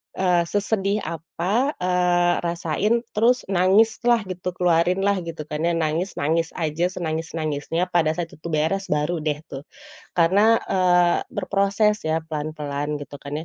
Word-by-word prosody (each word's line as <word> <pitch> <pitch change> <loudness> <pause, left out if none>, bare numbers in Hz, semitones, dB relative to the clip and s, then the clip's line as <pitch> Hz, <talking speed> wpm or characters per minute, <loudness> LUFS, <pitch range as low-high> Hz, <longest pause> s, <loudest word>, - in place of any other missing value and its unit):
eee, 180 -2 +2
sesedih 205 0 0
apa, 190 - -1
eee, 180 -1 +2
rasain 170 +5 0 0.2
terus 240 +4 +2
nangislah 220 +5 +3
gitu, 180 0 -4
keluarinlah 180 +3 +2
gitu, 165 -2 -6
kan, 150 +2 -2
ya, 170 - +2
nangis-nangis 165 0 -1
aja, 165 0 -1
senangis-nangisnya, 160 0 -2
pada 160 -3 +2
saat 165 0 -4
itu 160 - -8
beres 165 +6 0
baru, 150 +4 0
deh, 150 -1 -2
tuh. 135 +2 -8 0.5
Karena, 200 +7 +5
eee, 180 -2 +3
berproses, 200 +2 +1
ya, 160 +1 +2
pelan-pelan 150 -1 -3
gitu, 145 0 -10
kan, 145 +3 -5
175 Hz, 130 wpm, -23 LUFS, 155-195 Hz, 0.5 s, Karena